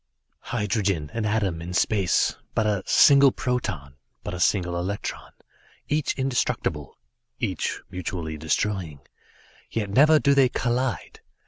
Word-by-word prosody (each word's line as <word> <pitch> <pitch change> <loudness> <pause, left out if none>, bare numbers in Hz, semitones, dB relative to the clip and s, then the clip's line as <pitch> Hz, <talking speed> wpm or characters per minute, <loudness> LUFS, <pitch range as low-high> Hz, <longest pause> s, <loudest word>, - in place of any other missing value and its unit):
"Hydrogen, 100 -8 -1
an 115 -2 -2
atom 100 -6 -1
in 90 +1 -6
space; 95 0 +2 0.2
but 110 - +1
a 105 -3 0
single 140 -1 +6
proton; 90 - -3 0.3
but - - -5
a 90 - -5
single 90 -2 +1
electron; 95 +4 -4 0.6
each 150 -1 0
indestructible; 130 -2 -2 0.4
each - - -2
mutually 85 -3 -4
destroying. 80 -1 -2 0.7
Yet 105 -3 -3
never 150 +8 +6
do 140 -1 +3
they 135 -2 +4
collide. 125 +1 -2
105 Hz, 120 wpm, -24 LUFS, 85-125 Hz, 0.7 s, single